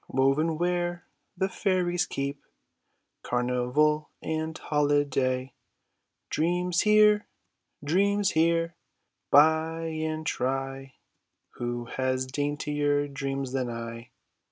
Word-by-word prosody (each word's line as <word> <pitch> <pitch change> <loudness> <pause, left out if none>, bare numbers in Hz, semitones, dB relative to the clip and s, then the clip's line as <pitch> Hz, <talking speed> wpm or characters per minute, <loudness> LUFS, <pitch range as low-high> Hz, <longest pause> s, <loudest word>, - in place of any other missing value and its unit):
Woven 140 +5 +2
where 175 0 -1 0.3
the 190 - +1
fairies 180 -3 0
keep 140 +1 -4 0.8
Carnival 125 +5 +1
and 160 0 -3
holiday; 140 -3 0 0.8
Dreams 175 +2 +1
here! 210 0 +5 0.6
Dreams 200 +6 +2
here! 165 +1 +2 0.6
buy 160 +2 +4
and 160 -1 -3
try; 135 0 -3 0.6
Who 120 0 -4
has 130 +1 -1
daintier 145 +1 -1
dreams 135 -1 -3
than 130 -2 -1
I? 115 0 -6
150 Hz, 85 wpm, -27 LUFS, 135-165 Hz, 0.8 s, here